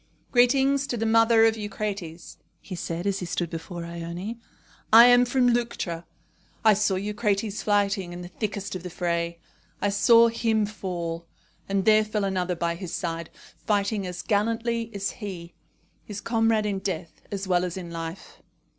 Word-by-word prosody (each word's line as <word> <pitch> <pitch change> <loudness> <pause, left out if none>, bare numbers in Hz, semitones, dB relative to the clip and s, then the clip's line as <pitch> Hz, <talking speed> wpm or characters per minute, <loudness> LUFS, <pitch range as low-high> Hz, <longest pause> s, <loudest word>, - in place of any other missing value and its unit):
"Greetings 270 +3 +3
to 245 - -2
the 225 - -1
mother 225 0 +5
of 225 0 +3
Eucrates," 200 -6 -5 0.2
he 195 - -9
said, 170 0 -4
as 200 -1 0
he 180 - -4
stood 175 -1 -2
before 170 +1 -6
Ione. 170 +6 -6 0.5
"I 230 +2 +10
am 245 0 +6
from 245 0 +3
Leuctra. 190 -8 -2 0.6
I 215 - +8
saw 205 -1 +1
Eucrates 210 +1 -1
fighting 200 -3 +1
in 175 0 -7
the - - -7
thickest 200 +1 -4
of 185 - -5
the 180 - -6
fray. 170 -1 -2 0.4
I 205 - +1
saw 230 +3 +6
him 225 -2 +1
fall; 170 -5 -5 0.4
and 195 -1 0
there 215 0 +6
fell 215 -1 -2
another 185 -2 -1
by 170 0 -1
his 170 0 -7
side, 165 -2 -4 0.3
fighting 205 -2 0
as 180 0 -6
gallantly 230 +2 0
as 200 -2 -3
he 180 -6 -8 0.5
his 210 -1 -7
comrade 225 -1 +1
in 200 -2 -1
death 175 -4 -5
as 200 -1 -4
well 180 -1 +2
as 180 0 -3
in 175 -2 -7
life." 165 +2 -7
200 Hz, 165 wpm, -26 LUFS, 175-225 Hz, 0.6 s, I